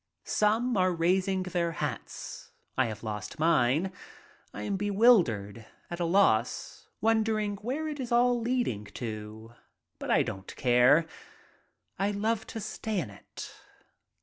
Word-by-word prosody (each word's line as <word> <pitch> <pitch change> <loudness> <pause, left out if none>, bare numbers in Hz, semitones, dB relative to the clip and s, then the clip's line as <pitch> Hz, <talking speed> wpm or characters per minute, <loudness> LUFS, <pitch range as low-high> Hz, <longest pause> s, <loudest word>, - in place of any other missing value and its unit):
Some 220 +3 +2
are 185 0 +3
raising 185 +3 +1
their 175 -2 -1
hats. 145 -6 -5 0.2
I 130 -2 +2
have 110 +1 -7
lost 105 +1 -5
mine. 160 +2 +2 0.6
I - - -7
am 200 - -1
bewildered, 185 - +3 0.2
at 175 - -4
a 175 - +1
loss, 165 - +1
wondering 220 -2 +1
where 265 +10 -3
it 300 -2 -5
is 250 -2 -4
all 240 0 +3
leading 230 - -1
to, 110 0 -7 0.5
but - - -6
I - - +4
don't 95 0 -7
care. 125 +6 +5 0.9
I 195 +1 +2
love 210 +2 -1
to 225 - -6
stay 215 0 -3
in 125 - -4
it. 100 - -10
185 Hz, 135 wpm, -29 LUFS, -, 0.9 s, care